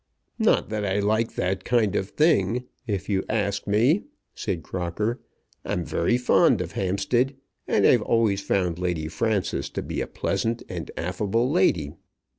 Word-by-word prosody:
"Not - - +3
that 110 -1 -2
I 95 -1 0
like 110 +3 +1
that 95 +1 -1
kind 115 -5 +2
of 95 - -1
thing, 125 - +2 0.2
if 100 -3 -2
you 95 -2 0
ask 100 -2 -1
me," 120 - +3 0.3
said 80 -4 -3
Crocker. 95 - -2 0.4
"I'm - - -2
very 120 - +1
fond 125 - +4
of 90 -1 -4
Hampstead, 120 +9 0 0.3
and - - +3
I've - - +5
always 110 -4 +2
found 90 -4 0
Lady 90 -4 -1
Frances 100 +4 -1
to - - -4
be - - -3
a - - -3
pleasant 115 +1 -2
and - - -6
affable 105 +8 0
lady. 90 - +2
100 Hz, 155 wpm, -25 LUFS, 90-115 Hz, 0.4 s, I've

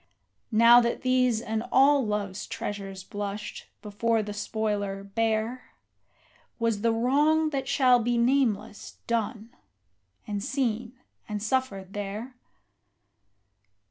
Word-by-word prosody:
Now 235 +2 +7
that 235 0 -2
these 255 -3 +2
and 220 -1 -2
all 275 +1 +5
Love's 205 -3 -3
treasures 195 -2 -5
blushed, 205 +1 -6 0.2
before 220 +2 0
the 210 0 -6
spoiler, 205 -2 -2
bare, 225 +4 -2 0.8
Was 230 -3 0
the 230 +1 +2
wrong 295 +7 +2
that 270 -2 -2
shall 255 -3 +4
be 240 +1 0
nameless 235 -4 0
done, 230 -1 -2 0.7
and 205 -1 -4
seen, 240 -2 -2 0.4
and 210 - -2
suffered 210 -6 -2
there? 205 +5 -5
225 Hz, 110 wpm, -27 LUFS, 205-250 Hz, 0.8 s, Now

